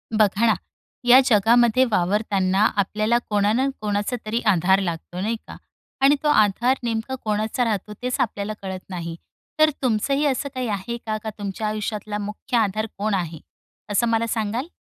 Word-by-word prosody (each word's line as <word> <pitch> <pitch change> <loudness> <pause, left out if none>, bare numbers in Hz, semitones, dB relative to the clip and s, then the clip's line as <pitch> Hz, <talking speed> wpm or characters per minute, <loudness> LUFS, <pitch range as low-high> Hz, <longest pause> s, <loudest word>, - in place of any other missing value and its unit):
बघा 215 +1 +3
ना. 220 - +5 0.5
या 245 +1 +8
जगामध्ये 235 +3 +4
वावरताना 195 0 +1
आपल्याला 215 +4 +1
कोणाना-कोणाचा 210 0 0
तरी 225 +2 -1
आधार 190 +2 +3
लागतो, 175 0 -4
नाही 215 +5 -1
का? - - -9 0.5
आणि 275 +2 +6
तो - - +1
आधार 240 +2 +3
नेमका 230 +2 -2
कोणाचा 215 +3 0
राहतो 210 -2 -2
तेच 250 0 -2
आपल्याला 205 -1 -1
कळत 190 -1 -5
नाही. 170 -3 -5 0.4
तर 310 0 +6
तुमचंही 270 +5 +1
असं 280 0 0
काही 255 -1 -2
आहे 205 +3 -3
का? 215 -1 -1
का 220 +1 -6
तुमच्या 205 +1 -4
आयुष्यातला 210 0 -3
मुख्य 210 +4 -3
आधार 215 -1 +1
कोण 210 +1 -1
आहे? 170 -4 -2 0.5
असं 220 +4 +2
मला 230 0 +1
सांगाल? 225 +5 -2
215 Hz, 155 wpm, -23 LUFS, 200-235 Hz, 0.5 s, या